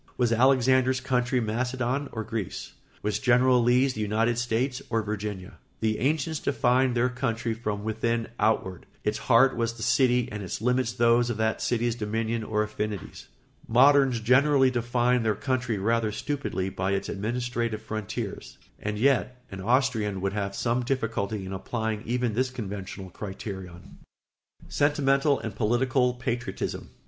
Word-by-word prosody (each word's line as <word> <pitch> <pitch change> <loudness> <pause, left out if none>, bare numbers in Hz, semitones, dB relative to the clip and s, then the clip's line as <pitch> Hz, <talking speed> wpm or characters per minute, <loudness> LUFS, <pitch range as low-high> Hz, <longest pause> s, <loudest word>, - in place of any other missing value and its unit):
Was 120 -2 +2
Alexander's 130 +1 +4
country 125 -1 0
Macedon 125 +4 -1
or 110 - -4
Greece? 110 -3 -5 0.3
Was 105 0 0
General 125 -1 +4
Lee's 125 +3 +3
the 110 - -4
United 115 +3 +1
States 125 +2 -1
or 115 -1 0
Virginia? 105 -3 -5 0.2
The 110 -1 0
ancients 150 +3 0
defined 130 -2 +2
their 120 +2 +3
country 115 -3 -2
from 105 -2 -4
within 115 +1 -1
outward; 105 -4 0 0.2
its 105 +1 -1
heart 130 +2 +4
was 115 -1 -1
the 115 -1 -8
city 125 -2 +3
and 105 0 -5
its 95 - -4
limits 125 +1 +1
those 120 +1 +3
of 120 - -2
that 110 0 0
city's 120 -1 0
dominion 115 0 -2
or 105 0 0
affinities. 105 -2 -5 0.4
Moderns 135 0 +5
generally 130 +3 +4
define 120 0 +1
their 110 -2 +1
country 130 -1 -1
rather 110 +2 +1
stupidly 130 -7 -3
by 95 +1 -2
its 100 - -1
administrative 115 +1 -2
frontiers; 110 -2 -5 0.2
and 105 0 -3
yet 125 +1 +1
an 95 0 -6
Austrian 115 -3 +1
would 100 +1 -2
have 100 -1 -3
some 120 +3 0
difficulty 110 -5 -2
in 95 - -6
applying 110 +2 -3
even 120 -1 0
this 130 +4 +1
conventional 100 -5 -6
criterion. 95 -3 -8 0.7
[Sidenote: - - -14
Sentimental 140 -1 +2
and 110 -3 -5
political 125 +2 +1
patriotism. 125 0 -4
115 Hz, 150 wpm, -27 LUFS, 105-125 Hz, 0.7 s, Moderns